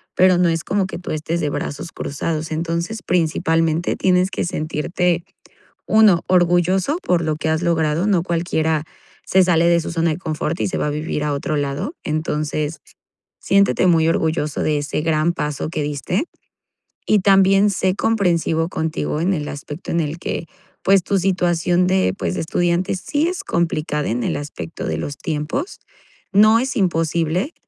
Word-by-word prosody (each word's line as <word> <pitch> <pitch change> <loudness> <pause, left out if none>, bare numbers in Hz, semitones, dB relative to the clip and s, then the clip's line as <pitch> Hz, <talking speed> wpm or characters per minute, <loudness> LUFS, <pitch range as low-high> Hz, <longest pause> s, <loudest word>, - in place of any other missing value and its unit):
pero 185 -1 +5
no 180 0 +3
es 165 0 -1
como 200 -1 0
que 190 - -7
tú 180 - -6
estés 155 +2 -2
de 150 - 0
brazos 145 +3 -5
cruzados. 155 +2 -4
Entonces, 170 +6 -2
principalmente, 165 -1 +1
tienes 185 0 +2
que - - -2
sentirte, 170 +2 -1 0.6
1, 215 -6 +5
orgulloso 180 - +2
por 175 -2 +1
lo 155 -1 -1
que 155 - -3
has 160 +1 0
logrado. 165 0 +1
No 190 -5 +2
cualquiera 160 -3 0 0.4
se 190 - +4
sale 170 -2 +3
de 170 0 +4
su - - -5
zona 165 0 +1
de 155 - -2
confort 160 -1 -3
y - - +1
se - - -3
va - - 0
a - - 0
vivir 150 0 -3
a 150 - 0
otro 145 +2 -2
lado. 145 - -2
Entonces, 155 -1 -2 0.6
siéntete 200 -1 +3
muy 165 -2 +4
orgulloso 160 -2 0
de 150 -1 +1
ese 145 +1 -2
gran 160 +1 +1
paso 150 -3 -3
que 155 -2 -2
diste, 150 - -2 0.8
y 215 - +4
también 195 +1 +5
sé 185 -1 0
comprensivo 170 -7 +1
contigo 160 -2 -2
en 180 +4 +1
el 150 -3 -3
aspecto 145 +3 -7
en 170 - 0
el 155 +1 -3
que, 170 - -4 0.4
pues, 195 -1 +5
tu 200 - +1
situación 175 -1 +1
de, 185 - +2
pues, 90 -2 -2
de - - -2
estudiante 175 +3 0
sí 290 - -1
es 360 0 -4
complicada 155 -3 -1
en 120 +2 -1
el - - -1
aspecto 145 - -6
de 80 - -2
los 145 - -4
tiempos, 160 - -3 0.5
no 215 +3 +6
es 265 +2 -3
imposible, 170 - 0
165 Hz, 170 wpm, -20 LUFS, 155-185 Hz, 0.8 s, no